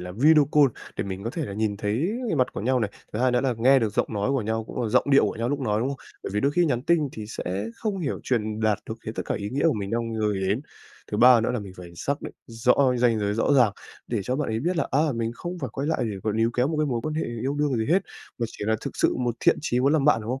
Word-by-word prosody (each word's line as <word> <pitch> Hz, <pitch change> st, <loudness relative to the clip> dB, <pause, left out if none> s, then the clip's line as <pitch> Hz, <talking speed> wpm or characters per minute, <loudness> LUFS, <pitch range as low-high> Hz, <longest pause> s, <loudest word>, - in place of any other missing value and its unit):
là 90 Hz, 0 st, -7 dB
video 150 Hz, -, +5 dB
call 150 Hz, -2 st, +6 dB, 0.3 s
để -, -, -2 dB
mình 95 Hz, +1 st, -6 dB
có 115 Hz, -, -2 dB
thể 160 Hz, +4 st, -3 dB
là 100 Hz, -, -6 dB
nhìn 105 Hz, 0 st, -1 dB
thấy 120 Hz, -, -1 dB, 0.2 s
mặt 130 Hz, -, +1 dB
của -, -, -5 dB
nhau 125 Hz, +3 st, +1 dB
này, 105 Hz, -3 st, -1 dB, 0.2 s
thứ 105 Hz, -, -3 dB
hai 130 Hz, +2 st, +3 dB
nữa 125 Hz, 0 st, +2 dB
là 130 Hz, -2 st, 0 dB
nghe 135 Hz, +4 st, +5 dB
được 110 Hz, -4 st, -1 dB
giọng -, -, +2 dB
nói 100 Hz, +5 st, 0 dB
của 135 Hz, -3 st, +1 dB
nhau, 110 Hz, +1 st, -2 dB
cũng 120 Hz, -, -5 dB
là 115 Hz, -, -1 dB
giọng -, -, +3 dB
điệu 135 Hz, -, +6 dB
của -, -, -3 dB
nhau 115 Hz, +1 st, -1 dB
lúc 145 Hz, 0 st, -1 dB
nói, 105 Hz, -4 st, 0 dB
đúng 125 Hz, -, 0 dB
không? 140 Hz, -, -3 dB, 0.3 s
Bởi -, -, -5 dB
vì 105 Hz, -, +1 dB
đôi 140 Hz, +4 st, +1 dB
khi 175 Hz, +3 st, +3 dB
nhắn 125 Hz, -6 st, 0 dB
tin 155 Hz, -1 st, +2 dB
thì 110 Hz, -, -7 dB
sẽ 100 Hz, -1 st, -4 dB
không 210 Hz, -3 st, -2 dB
hiểu 150 Hz, -6 st, -3 dB
truyền 110 Hz, -3 st, -1 dB
đạt 110 Hz, -2 st, +2 dB
được 110 Hz, 0 st, -5 dB
hết 110 Hz, -, -3 dB
tất -, -, -3 dB
cả -, -, -1 dB
ý 100 Hz, -1 st, -4 dB
nghĩa 140 Hz, +6 st, +1 dB
của 160 Hz, -, +4 dB
mình 100 Hz, -2 st, -4 dB
đang 115 Hz, 0 st, -2 dB
gửi 105 Hz, -3 st, 0 dB
đến. 105 Hz, +6 st, +1 dB, 0.5 s
Thứ -, -, 0 dB
ba 125 Hz, +1 st, +7 dB
nữa 115 Hz, -, 0 dB
là 125 Hz, -, -1 dB
mình 95 Hz, -2 st, -9 dB
phải 90 Hz, -1 st, -9 dB
xác 140 Hz, +10 st, -2 dB
định -, -, -6 dB
rõ 115 Hz, +2 st, +2 dB, 0.2 s
cái 125 Hz, -, 0 dB
ranh 120 Hz, -2 st, +3 dB
giới 105 Hz, 0 st, 0 dB
rõ 115 Hz, -, +1 dB
ràng, 125 Hz, -7 st, +5 dB, 0.3 s
để 115 Hz, -3 st, -1 dB
cho 125 Hz, +6 st, -2 dB
bạn 150 Hz, -, -1 dB
ấy 110 Hz, +1 st, -1 dB
biết 175 Hz, +5 st, -1 dB
là, 150 Hz, -, 0 dB
à, 140 Hz, -, +2 dB, 0.2 s
mình 115 Hz, -1 st, -1 dB
không 175 Hz, +6 st, -6 dB
phải 135 Hz, -6 st, -4 dB
quay 140 Hz, +2 st, -3 dB
lại 160 Hz, -, 0 dB
để 105 Hz, -3 st, -3 dB
mà 110 Hz, -, +1 dB
níu 115 Hz, +1 st, +2 dB
kéo 125 Hz, +2 st, +2 dB
một 160 Hz, -, -2 dB
cái 155 Hz, -, +2 dB
mối 120 Hz, -4 st, -1 dB
quan 155 Hz, +2 st, -3 dB
hệ 160 Hz, -, -1 dB
yêu 120 Hz, +4 st, -3 dB
đương 145 Hz, -2 st, 0 dB
gì 110 Hz, -1 st, -1 dB
hết, 180 Hz, +5 st, +3 dB, 0.4 s
mà 120 Hz, -, 0 dB
chỉ -, -, -7 dB
là 110 Hz, 0 st, +2 dB
thực -, -, -6 dB
sự -, -, +2 dB
một 120 Hz, -2 st, -1 dB
thiện -, -, +4 dB
chí 125 Hz, -5 st, 0 dB
muốn 140 Hz, +3 st, +3 dB
làm 155 Hz, -3 st, +2 dB
bạn, 145 Hz, -6 st, +4 dB
đúng 110 Hz, +2 st, -5 dB
không? 130 Hz, +1 st, -2 dB
120 Hz, 320 wpm, -25 LUFS, 110-140 Hz, 0.5 s, ba